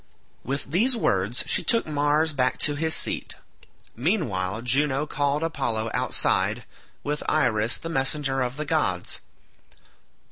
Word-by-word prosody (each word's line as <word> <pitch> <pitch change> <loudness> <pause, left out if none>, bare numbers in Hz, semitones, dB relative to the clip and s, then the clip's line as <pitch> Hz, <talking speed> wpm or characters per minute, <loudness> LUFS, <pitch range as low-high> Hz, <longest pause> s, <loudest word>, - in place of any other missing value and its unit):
With 140 +1 -4
these 235 +9 +4
words 100 - +1
she - - 0
took 230 -2 +2
Mars 150 +1 +1
back 130 -2 +1
to 145 - +3
his 160 +2 +1
seat. - - -1 0.6
Meanwhile 110 - -1
Juno 135 +3 +1
called 145 +1 0
Apollo 115 -9 -2
outside, - - +1 0.4
with 150 +1 -2
Iris 115 -6 +2
the - - -7
messenger 135 -2 0
of 125 +2 -2
the 150 - -3
gods. 95 - -1
145 Hz, 130 wpm, -25 LUFS, 120-155 Hz, 0.6 s, these